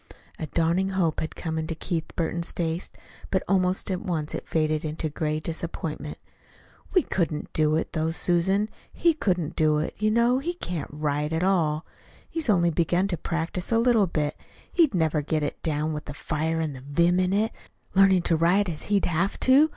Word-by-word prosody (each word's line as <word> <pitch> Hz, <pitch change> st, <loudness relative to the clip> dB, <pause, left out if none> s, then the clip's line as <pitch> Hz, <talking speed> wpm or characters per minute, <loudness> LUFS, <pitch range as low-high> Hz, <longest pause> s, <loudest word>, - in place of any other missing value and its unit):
A 155 Hz, -, -3 dB
dawning 170 Hz, +5 st, +1 dB
hope 180 Hz, -5 st, 0 dB
had 160 Hz, -, -4 dB
come 160 Hz, -2 st, -3 dB
into 160 Hz, +1 st, -3 dB
Keith 165 Hz, 0 st, -2 dB
Burton's 170 Hz, 0 st, -1 dB
face, 165 Hz, +1 st, -2 dB, 0.4 s
but 190 Hz, -, +1 dB
almost 185 Hz, 0 st, +1 dB
at 185 Hz, -, -1 dB
once 165 Hz, -7 st, -2 dB
it -, -, -5 dB
faded 155 Hz, 0 st, +1 dB
into 155 Hz, 0 st, -3 dB
gray 155 Hz, 0 st, -1 dB
disappointment. 160 Hz, -2 st, -4 dB, 0.8 s
"We 365 Hz, -, +6 dB
couldn't 160 Hz, -5 st, -2 dB
do 155 Hz, 0 st, +3 dB
it, 160 Hz, -, -2 dB
though, 160 Hz, -1 st, 0 dB
Susan. 185 Hz, +5 st, +1 dB, 0.2 s
He 335 Hz, -1 st, +3 dB
couldn't 180 Hz, -, -1 dB
do 155 Hz, -2 st, +3 dB
it. 155 Hz, -, -2 dB
You 215 Hz, 0 st, +2 dB
know 235 Hz, +3 st, +3 dB
he 345 Hz, +6 st, -3 dB
can't 180 Hz, -, -4 dB
write 150 Hz, 0 st, -1 dB
at 160 Hz, +2 st, 0 dB
all. 165 Hz, -5 st, +2 dB, 0.4 s
He's 325 Hz, -7 st, -3 dB
only 175 Hz, -4 st, +4 dB
begun 175 Hz, +4 st, +1 dB
to 180 Hz, -, 0 dB
practice 170 Hz, +4 st, -3 dB
a 230 Hz, -, +4 dB
little 230 Hz, -4 st, +4 dB
bit. 150 Hz, -3 st, -1 dB, 0.4 s
He'd 320 Hz, -, +4 dB
never 160 Hz, -3 st, +2 dB
get 155 Hz, +1 st, -1 dB
it 145 Hz, -, -3 dB
down, 155 Hz, 0 st, -1 dB
with 150 Hz, -, -5 dB
the 145 Hz, -, -7 dB
fire 160 Hz, +2 st, -1 dB
and 155 Hz, -3 st, -2 dB
the 130 Hz, -, -9 dB
vim 170 Hz, +6 st, +2 dB
in 185 Hz, 0 st, +2 dB
it, 210 Hz, +3 st, +2 dB, 0.4 s
learning 190 Hz, -2 st, +5 dB
to 170 Hz, -, +3 dB
write 180 Hz, +5 st, +3 dB
as 155 Hz, -3 st, -5 dB
he'd 205 Hz, -1 st, +3 dB
have 175 Hz, +4 st, 0 dB
to. 275 Hz, +4 st, +6 dB
170 Hz, 190 wpm, -26 LUFS, 155-190 Hz, 0.8 s, We